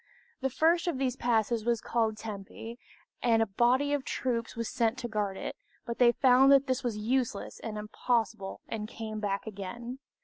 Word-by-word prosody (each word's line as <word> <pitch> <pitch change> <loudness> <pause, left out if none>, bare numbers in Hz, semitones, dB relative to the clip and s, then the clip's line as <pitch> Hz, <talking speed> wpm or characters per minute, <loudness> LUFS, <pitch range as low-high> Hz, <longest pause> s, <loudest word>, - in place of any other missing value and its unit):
The 265 - 0
first 330 +7 +2
of 335 -6 0
these 260 -2 0
passes 230 -2 +1
was 235 0 +1
called 220 -1 0
Tempe, 220 +3 -7 0.4
and 230 -2 +4
a 225 - +4
body 245 +7 +2
of 285 -2 0
troops 235 -3 -2
was 230 -1 -2
sent 230 0 +1
to 250 -2 -4
guard 205 -3 -2
it; - - -5 0.3
but 235 - -4
they 240 -1 +7
found 260 +2 +5
that 275 0 +6
this 260 0 -1
was 235 -4 -1
useless 230 -1 -1
and 215 -2 -5
impossible, 215 -1 -1
and 215 -2 -4
came 220 -1 -6
back 200 -2 -2
again. 230 +5 -6
235 Hz, 180 wpm, -30 LUFS, 215-255 Hz, 0.4 s, they